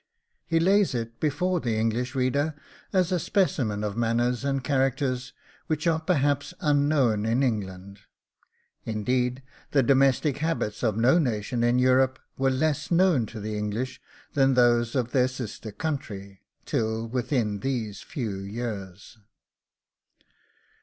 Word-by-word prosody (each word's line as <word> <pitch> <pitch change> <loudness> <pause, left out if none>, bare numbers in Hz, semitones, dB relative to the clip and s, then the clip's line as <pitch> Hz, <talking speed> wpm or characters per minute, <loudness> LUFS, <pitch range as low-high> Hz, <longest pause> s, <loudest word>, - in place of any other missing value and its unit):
He 165 -1 +2
lays 195 -2 +3
it 115 -1 -4
before 175 +5 0
the 120 -6 -1
English 115 +4 -1
reader 140 +4 +1 0.4
as 185 -2 +2
a 180 - +2
specimen 130 - 0
of 105 -1 -2
manners 120 +2 0
and 135 -1 -1
characters 130 -2 0 0.4
which 155 0 -1
are 165 -1 +2
perhaps 145 -4 0
unknown 140 -7 +2
in 115 +5 +1
England. 100 -4 -3 0.8
Indeed, 125 +4 -1 0.3
the 135 -2 +4
domestic 135 +2 +3
habits 155 -9 -2
of 110 -3 0
no 125 +9 +4
nation 120 -3 -1
in 120 +1 +3
Europe 130 +1 +3 0.2
were 135 0 +1
less 145 +3 0
known 170 - +3
to 110 - -8
the 105 +1 -4
English 105 +5 -3 0.3
than 135 -2 +3
those 120 -1 +3
of 120 -3 0
their 125 -1 +3
sister 120 -4 -6
country, 100 -9 -5 0.2
till 110 0 -1
within 120 -3 -1
these 115 -4 -3
few 115 - -4
years. 100 -1 -6
125 Hz, 135 wpm, -26 LUFS, 110-140 Hz, 0.8 s, the